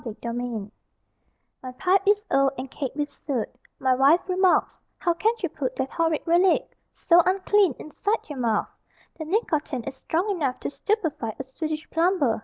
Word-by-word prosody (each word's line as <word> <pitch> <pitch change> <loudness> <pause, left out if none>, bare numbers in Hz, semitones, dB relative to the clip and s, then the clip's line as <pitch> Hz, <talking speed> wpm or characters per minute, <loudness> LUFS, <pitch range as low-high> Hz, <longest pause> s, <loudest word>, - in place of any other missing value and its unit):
MY 230 - -5
PIPE 235 -3 -4 0.9
My 255 - -7
pipe 370 +7 +2
is 415 0 +4
old 275 0 +3
And 260 +1 -6
caked 270 -2 -4
with 295 -1 -2 0.2
soot; 260 -6 -1 0.3
My 260 -1 +2
wife 275 +8 +4
remarks: 370 0 +3 0.2
"How 345 - +1
can 440 +7 +1
you - - +1
put - - -4
That 265 - -2
horrid 325 -2 0
relic, 350 +2 +3 0.2
So 345 0 +4
unclean, 380 -3 +2
Inside 410 +8 -3
your 290 -4 -6
mouth? 225 -3 0 0.5
The 315 - -4
nicotine 310 - -1
Is 275 - -5
strong 330 +8 -1
enough 285 -9 -1
To - - -3
stupefy 320 - -2
A 270 - -4
Swedish 310 +4 -5
plumber." 330 -9 +2
310 Hz, 170 wpm, -25 LUFS, 260-370 Hz, 0.9 s, is